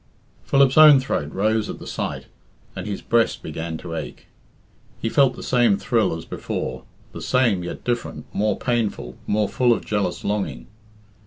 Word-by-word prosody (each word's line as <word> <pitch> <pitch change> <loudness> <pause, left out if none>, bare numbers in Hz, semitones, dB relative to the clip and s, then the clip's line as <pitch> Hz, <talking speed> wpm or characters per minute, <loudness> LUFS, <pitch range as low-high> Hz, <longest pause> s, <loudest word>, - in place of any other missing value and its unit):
Philip's 140 +1 +4
own 150 -3 +9
throat 75 - -2
rose 110 +2 0
at - - -5
the - - -11
sight, - - -4 0.5
and 95 +2 -5
his 100 - -4
breast 115 -1 +1
began 80 +1 -5
to 85 0 -8
ache. 80 -2 -6 0.7
He 115 - -1
felt 135 +1 +3
the - - -9
same 120 -5 +3
thrill 105 -6 +1
as 80 - -9
before - - -5 0.3
the - - -8
same, 115 -8 +2
yet 85 - -6
different, 120 -1 -3
more 105 0 0
painful, 110 - -2
more 105 0 +1
full 125 +3 +2
of 115 - 0
jealous 105 -1 -1
longing. 100 -12 -2
105 Hz, 165 wpm, -22 LUFS, 90-120 Hz, 0.7 s, own